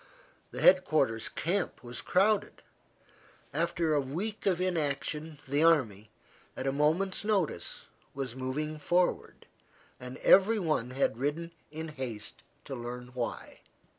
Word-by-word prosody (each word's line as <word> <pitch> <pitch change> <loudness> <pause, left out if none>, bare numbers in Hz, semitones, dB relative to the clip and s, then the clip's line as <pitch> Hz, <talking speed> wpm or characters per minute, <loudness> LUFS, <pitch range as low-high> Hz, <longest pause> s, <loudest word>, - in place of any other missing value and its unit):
The - - -6
head 185 0 +7
quarters 130 -10 +1
camp 180 -2 -1
was 120 0 -5
crowded. 200 +2 +1 0.9
After 165 +1 +1
a 145 - +3
week 195 +12 -4
of 180 -3 +2
inaction 155 -3 -1
the 145 +3 +2
army, 115 -11 +3 0.5
at 130 - -4
a 135 - +2
moment's 160 +8 +1
notice, 190 - -1 0.3
was 135 -3 -4
moving 150 +4 -3
forward, 175 +3 0 0.5
and 125 +1 -8
every 200 +4 +6
one 155 - 0
had 130 -3 0
ridden 155 +5 -2 0.2
in 160 +2 -6
haste 125 -8 -6 0.2
to - - -6
learn 125 0 -6
why. 125 -1 -5
150 Hz, 130 wpm, -30 LUFS, 130-175 Hz, 0.9 s, head